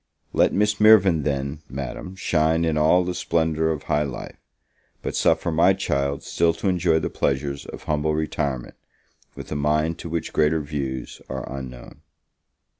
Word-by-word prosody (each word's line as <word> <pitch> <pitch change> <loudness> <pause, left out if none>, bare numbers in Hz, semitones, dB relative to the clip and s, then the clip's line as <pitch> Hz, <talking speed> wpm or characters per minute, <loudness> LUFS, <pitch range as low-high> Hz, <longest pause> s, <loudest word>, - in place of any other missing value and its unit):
Let - - +4
Miss 105 +1 +1
Mirvan, 100 -7 +6
then, 70 +1 -2
Madam, 70 +7 -6
shine 80 -2 +1
in 80 -1 0
all 80 +4 +4
the 90 0 -2
splendour 80 -2 0
of 80 -3 -2
high 75 - +1
life; 70 -4 -6 0.6
but - - -3
suffer 85 - +2
my 85 +4 +4
child 70 -5 -1
still 85 -1 +1
to 100 - -3
enjoy 90 -3 +2
the 80 - -2
pleasures 70 0 -1
of - - -9
humble 75 0 0
retirement, 70 -4 -2 0.6
with - - -9
a - - -2
mind 75 +3 0
to 85 - -6
which 85 0 -3
greater 80 +1 +2
views 70 -3 -5
are - - -5
unknown. 65 -2 -9
80 Hz, 160 wpm, -23 LUFS, 70-85 Hz, 0.6 s, Mirvan